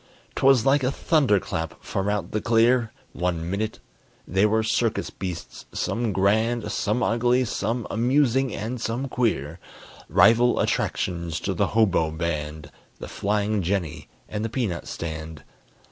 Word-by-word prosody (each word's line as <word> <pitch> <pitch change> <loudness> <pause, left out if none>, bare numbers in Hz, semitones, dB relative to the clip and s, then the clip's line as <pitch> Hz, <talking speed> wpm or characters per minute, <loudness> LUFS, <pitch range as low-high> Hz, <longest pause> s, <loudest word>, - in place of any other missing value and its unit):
'Twas 135 -3 +4
like 140 +1 +4
a 125 - +2
thunder 140 - +2
clap 80 -2 -4
from 95 +1 -2
out 100 -4 -2
the 105 - -1
clear 115 0 +3 0.2
One 85 -2 -2
minute 110 +2 -2 0.5
they 95 +4 +3
were 110 +1 +1
circus 115 0 0
beasts, 90 -3 -7
some 115 -1 -1
grand, 110 +5 +1
Some 110 +4 0
ugly, 120 +3 +2
some 115 +1 -2
amusing, 130 +2 +2
and 115 +4 -4
some 120 +4 -2
queer: 90 - -1 0.5
Rival 120 +2 +5
attractions 85 -3 -1
to - - -1
the - - +1
hobo 95 -8 +3
band, 75 -2 -4 0.3
The - - -8
flying 105 0 0
jenny, 90 -3 -2 0.2
and 105 0 -4
the 115 - -2
peanut 110 - -2
stand. 80 -2 -6
110 Hz, 140 wpm, -24 LUFS, 90-120 Hz, 0.5 s, Rival